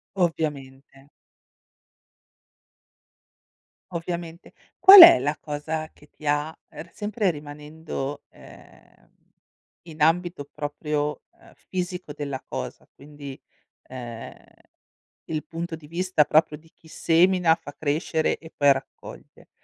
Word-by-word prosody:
Ovviamente. 140 -6 -4 2.8
Ovviamente. 170 -1 -6 0.3
Qual 390 0 +11
è 335 - +11
la 145 +4 -2
cosa 155 +1 -5
che 150 - -21
ti 155 - -16
ha 145 +1 +1 0.2
ehm, - - -10
r 170 - -21
sempre 205 -2 -1
rimanendo, 150 -1 -7
ehm, - - -19 0.7
in 160 -2 -13
ambito 170 0 +1
proprio, 150 0 -3
uhm, - - -22
fisico 180 -3 -6
della 140 -3 -6
cosa, - - -7
quindi, 145 -1 -11 0.4
ehm, 120 -3 -9 0.9
il 155 -1 -4
punto 165 0 -6
di 155 -2 -15
vista 175 0 +1
proprio 150 0 +2
di 160 +1 -23
chi 160 - -21
semina, 170 +1 +3
fa 160 -3 -11
crescere 155 +1 -1
e 160 - -14
poi 145 -1 +5
raccoglie. 135 - -10
155 Hz, 110 wpm, -24 LUFS, 145-170 Hz, 2.8 s, Qual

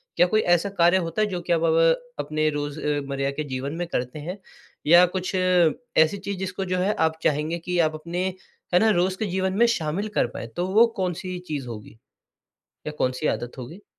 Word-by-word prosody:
क्या - - +5
कोई 215 +4 +2
ऐसा 175 +1 +2
कार्य 175 +2 +5
होता 170 +3 -2
है 215 - +3
जो 180 -3 -4
कि 175 - 0
आप 165 - +1
ब 165 0 +4 0.2
अपने 155 +1 0
रोज़ 145 0 -4
अ, 145 -1 0
मर्रा 140 0 -1
के 155 +2 -4
जीवन 135 0 -4
में 175 +1 -2
करते 125 -2 -3
हैं 175 +6 -6 0.5
या 175 +3 +8
कुछ 185 +1 -2
ऐसी 185 +1 +2
चीज़ 200 0 -5
जिसको 190 0 -3
जो 185 0 -1
है 195 +3 +1
आप 160 0 +1
चाहेंगे 155 +3 0
कि 180 +2 -3
आप 155 - -6
अपने 170 +4 -3 0.5
है 180 - +6
ना 220 - +4
रोज़ 185 +1 0
के 220 - 0
जीवन 190 0 -1
में 235 - +5
शामिल 185 -1 -1
कर - - +3
पाएँ। 120 - -7
तो 180 - -1
वो 215 +5 +6
कौन-सी 185 0 -3
चीज़ 145 -5 -4
होगी 110 -1 -9 0.9
या - - -2
कौन-सी 130 +4 0
आदत 120 +2 -3
होगी? 160 +11 -9
170 Hz, 210 wpm, -24 LUFS, 150-185 Hz, 0.9 s, या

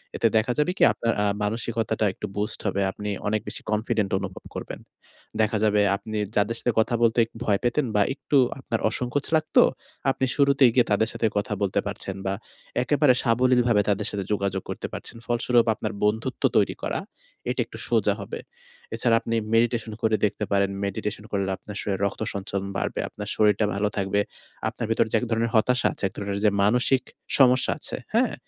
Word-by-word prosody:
এতে 115 - +3
দেখা 110 +3 +1
যাবে 150 +4 +2
কি? - - +3
আপনার 115 - 0
আ - - +2 0.2
মানসিকতাটা 110 0 -1
একটু 105 - -6
বুস্ট 105 +1 -2
হবে। 100 0 0
আপনি 105 +2 -6 0.2
অনেক 110 0 +1
বেশি - - -3
কনফিডেন্ট 105 -1 0
অনুভব 95 -1 -7
করবেন। - - -6 0.6
দেখা 110 +1 +2
যাবে 105 -1 +3 0.2
আপনি 110 +2 -6 0.2
যাদের 105 +3 +2
সাথে 120 - +1
কথা 120 +2 +2
বলতে 115 +1 +3 0.2
ভয় 100 -3 +2
পেতেন 125 +4 +1
বা 105 - +4
একটু 145 +1 0 0.2
আপনার 115 -3 -2
অসংকোচ 125 +5 -2
লাগতো, 155 -1 +4 0.5
আপনি 135 - 0
শুরুতেই 140 -2 +5
গিয়ে 125 - +5
তাদের 110 +2 +2
সাথে 115 - +1
কথা 105 +2 -1
বলতে 100 -2 +1
পারছেন 95 - -5
বা 95 - 0 0.5
একেবারে 145 0 +4
সাবলীলভাবে 120 -2 +3
তাদের 100 - +1
সাথে 100 -1 -3
যোগাযোগ 100 -1 0
করতে - - -4
পারছেন। - - -6
ফলস্বরূপ 120 0 +2
আপনার 110 +1 -4
বন্ধুত্ব 110 +5 -1
তৈরি - - +2
করা, - - -1 0.5
এটা - - -2
একটু - - -11
সোজা - - +2
হবে। - - -6 0.6
এছাড়া 115 -2 +3
আপনি 115 - -2 0.2
মেডিটেশন 115 -1 +1
করে 110 -1 +3
দেখতে 105 - -2
পারেন, 100 -1 +3 0.2
মেডিটেশন 105 +2 -3
করলে 100 -1 0
আপনার 105 -1 -9
শরীরে 95 -2 -2
রক্ত 100 - -3
সঞ্চালন 100 0 -3
বাড়বে, - - -2
আপনার 105 0 -7
শরীরটা 105 0 +3
ভালো 105 +1 +1
থাকবে। 100 +1 +1 0.5
আপনার - - -5
ভেতরে 115 - +2
যে - - +5
এক - - -3
ধরনের 115 +1 +1
হতাশা 125 +3 +3
আছে, - - -9
এক - - -10
ধরনের 100 0 -3
যে - - +7
মানসিক 125 +5 +3 0.4
সমস্যা 130 -1 +5
আছে। - - -1 0.2
হ্যাঁ? - - +2
110 Hz, 180 wpm, -25 LUFS, 100-120 Hz, 0.6 s, যে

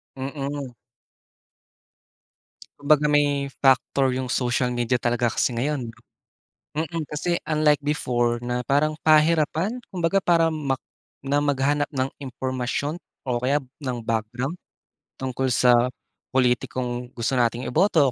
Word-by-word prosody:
Mm. 140 -1 -5 2.0
Kumbaga 150 +1 +4
may 145 -1 +2 0.2
factor 135 0 +3
yung 130 0 -2
social 125 0 +1
media 120 +1 +1
talaga 120 -1 +1
kasi 120 - 0
ngayon. 130 0 -1 0.9
Mm 160 0 -2
kasi 170 +3 -1
unlike 150 -2 +3
before 120 -5 0
na 125 0 -1
parang 145 +5 +2
pahirapan 160 +8 +3
kumbaga 185 +1 +1
parang 165 -2 +3
mak 140 -4 -1 0.5
na 145 +2 +2
maghanap 145 0 +1
ng 130 -2 -2
impormasyon 130 +4 -3 0.2
o 125 -2 -1
kaya 135 +4 +2 0.2
ng 130 -3 -3
background, 115 +6 -2 0.6
tungkol 130 0 -2
sa 125 0 +4 0.4
pulitikong 125 -1 0
gusto 120 +3 -1
nating 120 0 +1
iboto 160 0 +3
135 Hz, 115 wpm, -24 LUFS, 125-150 Hz, 2.0 s, Kumbaga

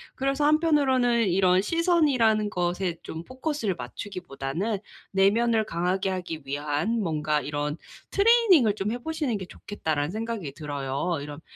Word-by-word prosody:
그래서 275 +2 0
한편으로는 270 - +3
이런 185 0 +4
'시선이라는 270 - +2
것에 180 -1 -1
좀 160 +1 -6
포커스를 260 - -2
맞추기보다는 175 - -4 0.3
내면을 220 +3 +3
강하게 185 +3 -1
하기 175 -5 -5
위한 145 +11 -1
뭔가 150 -4 0
이런 145 0 -2 0.4
트레이닝을 400 - +5
좀 210 0 -2
해 - - -2
보시는 295 -6 -2
게 190 - -6
좋겠다.'라는 160 -6 -3
생각이 220 -9 -4
들어요. 145 +2 -3
이런 145 +1 -8
195 Hz, 345 characters per minute, -26 LUFS, 160-245 Hz, 0.4 s, 트레이닝을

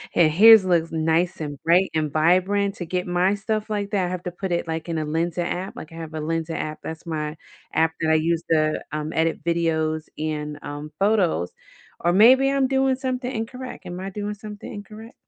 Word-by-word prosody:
And 160 -2 +5
his 215 +4 +8
looks 170 -3 +1
nice 165 +2 +1
and 145 -2 -5
bright 175 +2 +3
and 155 -2 0
vibrant 185 +6 +2
to 175 - -6
get 180 +2 -2
my 180 +3 +2
stuff 215 +1 -3
like 205 -2 -2
that, 190 -3 +1
I - - -4
have 180 -1 -4
to 180 - -4
put 185 +1 -5
it, 170 -1 -1
like, 160 +1 -4
in 165 - -1
a 155 - -1
Lensa 165 +3 -1
app, 185 +3 -4
like, 155 - -9
I - - -11
have 165 -1 -7
a 155 - -3
Lensa 165 +1 -2
app 155 0 -4
that's 160 +2 -7
my 155 -1 -3 0.4
app 160 0 +3
that 160 - +1
I - - +5
use 165 +1 +1
to, 155 -1 +2
um, 155 +1 -4
edit 160 -1 0
videos 160 -2 0
and, 150 -1 -3
um, 145 +1 -7
photos. 195 - +2 0.5
Or 170 - +2
maybe 260 +7 +6
I'm 275 -1 +2
doing 265 0 +2
something 255 -1 -3
incorrect. 250 +2 -6
Am 180 +1 -6
I 190 - -5
doing 205 +1 -4
something 210 0 -9
incorrect? 215 +3 -10
175 Hz, 210 wpm, -23 LUFS, 160-205 Hz, 0.5 s, his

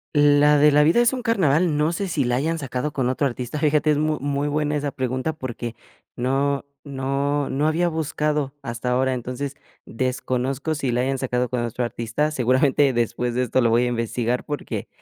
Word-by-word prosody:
La 145 0 +5
de 150 +1 +6
La 145 +1 +5
Vida 165 +11 +4
Es 240 +2 +3
Un 255 - -3
Carnaval, 175 - +2
no 150 +2 +2
sé 195 +3 -3
si 160 -6 0
la 125 0 0
hayan 160 +5 0
sacado 140 0 -3
con 130 -4 -1
otro 135 +2 +1
artista, 125 +3 -5
fíjate, 150 +1 +2
es 150 - +1
muy 155 0 +1
muy 140 +1 -1
buena 150 0 0
esa 145 -1 -1
pregunta 130 +4 -2
porque 120 -5 -6 0.4
no 135 +3 0 0.2
no 140 +1 -1
no 145 +3 +1
había 170 +3 +1
buscado 150 -3 -1
hasta 115 +1 -4
ahora. 130 +1 +1
Entonces, 125 +3 -4 0.3
desconozco 130 +4 -2
si 140 -4 -2
la 120 +1 +1
hayan 135 +1 -1
sacado 125 -1 0
con 125 -2 -1
otro 120 +1 -2
artista. 120 +6 -2
Seguramente 135 +1 +3
después 120 +1 -1
de 125 - +1
esto 125 +1 +1
lo 120 - +3
voy 115 +2 +3
a - - +1
investigar, 120 +1 -1
porque 145 -1 -4
140 Hz, 195 wpm, -23 LUFS, 125-150 Hz, 0.4 s, de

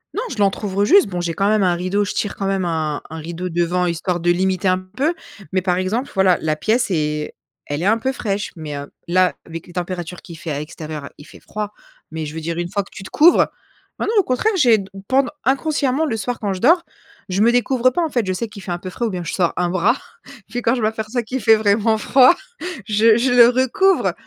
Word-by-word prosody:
Non, 430 - -1
je 240 - -6
l'entrouvre, 200 0 0
heu, - - +3
juste. 390 - +6
Bon, 180 -2 -3
j'ai 170 -1 -2
quand 195 +3 0
même 215 -2 +3
un 180 -2 +3
rideau. 185 +4 0
Je - - -4
tire 205 - -2
quand 195 - -4
même 195 -1 0
un 160 -3 -2
un 160 - -7
rideau 170 +3 -5
devant, 175 +1 0
histoire 175 +1 -1
de 175 - 0
limiter 190 +2 0
un 185 0 +3 0.2
peu. 310 +6 +1 0.4
Mais, 185 -1 +1
par 180 -1 +1
exemple, 215 +9 -2
voilà, 190 -2 +4
la 155 -1 0
pièce 220 +7 0
est 150 -2 -1 0.3
elle 145 +2 -3
est - - -1
un 220 +3 +4
peu 265 +3 -1
fraîche, 205 -5 -3
mais 155 -3 -6
heu, 140 0 -8 0.2
là, 185 +1 +2
avec 165 0 -7
les 175 - -13
températures 180 -1 -5
qu'il 170 -2 -11
fait 160 - -6
à 145 - -2
l'extérieur, 150 -1 -7
il 145 - -13
fait - - -15
froid. 210 -1 -5 0.4
Mais 160 -1 -4
je 150 - -8
veux 160 - -4
dire, 165 +1 -3
une 175 0 -3
fois 200 0 -1
que - - -18
tu - - -10
te - - -9
couvres 335 +4 +5 0.5
ah - - -1
non, 440 - 0
au - - +4
contraire, 260 - +1
j'ai 230 - +4 0.2
pend 270 +1 +3 0.2
inconsciemment, 275 +1 +1
le 230 -7 -2
soir, 230 +4 -3
quand 205 -2 -2
je 185 - -6
dors, 335 - +4 0.5
je 185 +2 0
me 230 +2 +5
découvre 245 +1 +2
pas, 340 +7 0
en 320 - -1
fait. 240 -5 0
Je 185 - 0
sais 225 +5 -3
qu'il 205 -3 -11
fait 180 - -5
un 175 - -2
peu 185 - -7
frais 235 +6 -3
ou 225 - 0
bien 180 -2 -4
je - - -4
sors 175 -3 +1
un 175 -1 0
bras. 185 +8 +2 0.5
Puis, 245 +2 -3
quand 230 - +3
je 245 - -3
m'aperçois 220 +2 -1
qu'il 255 +4 -4
fait 225 -2 +5
vraiment 215 +1 +2
froid, 260 +8 +5 0.5
je 215 +1 +4
je 245 +1 +1
le 240 -1 +8
recouvre. 260 +10 +2
195 Hz, 250 wpm, -20 LUFS, 175-240 Hz, 0.5 s, le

